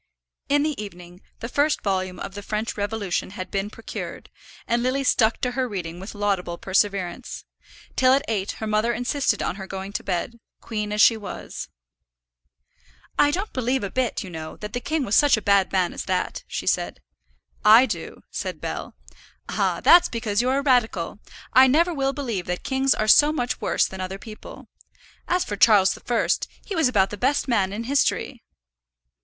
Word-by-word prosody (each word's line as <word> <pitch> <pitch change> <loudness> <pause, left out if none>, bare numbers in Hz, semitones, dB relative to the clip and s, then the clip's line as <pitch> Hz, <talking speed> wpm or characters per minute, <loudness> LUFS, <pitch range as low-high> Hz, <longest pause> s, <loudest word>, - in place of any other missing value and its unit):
In 290 +1 +3
the 300 -8 -2
evening 180 -2 -11 0.2
the 230 - -3
first 290 +5 +1
volume 185 -2 -1
of 195 - -6
the 205 - -7
French 215 +2 -3
Revolution 205 -3 -2
had 185 - -6
been 195 +1 -2
procured, 225 +1 -8 0.4
and 235 +1 +1
Lily 260 +3 0
stuck 225 -3 +3
to 250 - 0
her 255 0 -1
reading 175 -4 -5
with 195 +3 -8
laudable 195 -4 -1
perseverance; 195 -1 -1 0.5
till 255 -1 +4
at 270 +1 +3
eight 205 -3 -1
her 220 - -6
mother 215 +2 +1
insisted 250 +4 0
on - - -2
her 190 -2 -7
going 195 +1 -6
to - - -3
bed, 195 +6 -3 0.2
queen 210 -2 -4
as 210 0 +2
she 225 - +6
was. 205 -3 -7 1.5
"I 290 - +6
don't 380 +8 -3
believe 255 0 0
a 195 - -3
bit, 255 -3 -1
you 185 - -9
know, 160 -1 -7
that 210 +1 -7
the 245 - -1
king 300 +2 -1
was 205 - +1
such 290 -5 +5
a - - -1
bad 200 -1 +3
man 185 -2 +1
as - - -5
that," 185 -1 -2
she - - -4
said. - - 0 0.6
"I 225 +4 +8
do," - - -6
said - - -4
Bell. - - -5 0.5
"Ah, - - 0
that's 350 0 +7
because 225 -3 -1
you're 255 +2 +1
a 280 - -1
radical. 225 - +1 0.3
I 260 +1 +8
never 335 +7 +3
will 270 -2 0
believe 235 -11 -3
that 180 0 -3
kings 265 0 +2
are 215 - -1
so 295 +7 +7
much 250 -5 -2
worse - - +2
than 190 0 -6
other 185 +1 -4
people. 215 +1 -11 0.6
As 360 0 +1
for 205 - -4
Charles 200 -3 +5
the - - -11
First, 240 -2 0 0.2
he 410 - -5
was 320 -5 +3
about 200 -6 +2
the 210 - -5
best 275 +7 +1
man 200 -6 +1
in 215 +3 -4
history." 270 -1 0
220 Hz, 190 wpm, -24 LUFS, 195-260 Hz, 1.5 s, I